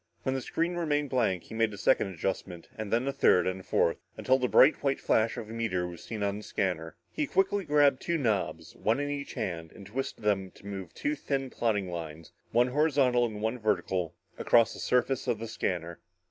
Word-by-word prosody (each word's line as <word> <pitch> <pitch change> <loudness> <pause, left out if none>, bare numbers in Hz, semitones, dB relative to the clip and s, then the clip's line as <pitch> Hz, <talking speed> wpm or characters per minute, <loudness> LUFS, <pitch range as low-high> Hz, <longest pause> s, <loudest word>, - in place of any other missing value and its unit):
When 130 - 0
the 135 - -2
screen 170 +6 -1
remained 150 -4 0
blank, 95 -9 +1
he - - -12
made 115 -1 +1
a - - -11
second 100 - +3
adjustment, 90 -1 -4
and 110 -2 -5
then 120 +4 +1
a 140 - 0
third 90 -9 +4
and 95 0 -2
fourth, 85 - +2 0.2
until 130 +1 +3
the 125 - +1
bright 135 +4 +6
white 140 -1 +1
flash 110 +1 +2
of 110 - -5
a 110 - -8
meteor 110 -6 -1
was 85 -1 -8
seen 110 -3 -4
on 100 0 0
the 105 - -8
scanner. 80 -6 -2 0.2
He 305 -2 -1
quickly 195 -2 +1
grabbed 145 -3 +4
two 170 -1 0
knobs, 95 - -1
one 115 +5 +1
in 145 0 -1
each 140 -1 -5
hand, 85 -3 -4
and 100 - -12
twisted 115 +2 -4
them 100 -3 +1
to - - -17
move 95 -4 -6
two 145 - -1
thin, 135 -3 -2
plotting 105 -6 0
lines, 80 -2 -7 0.2
one 120 +2 +3
horizontal 130 -4 +3
and 105 -1 -7
one 115 +3 -1
vertical, 95 -6 -1 0.2
across 115 -2 +4
the - - -10
surface 125 +1 +1
of - - +1
the 115 +2 -6
scanner. 85 -6 -3
110 Hz, 215 wpm, -29 LUFS, 95-135 Hz, 0.2 s, bright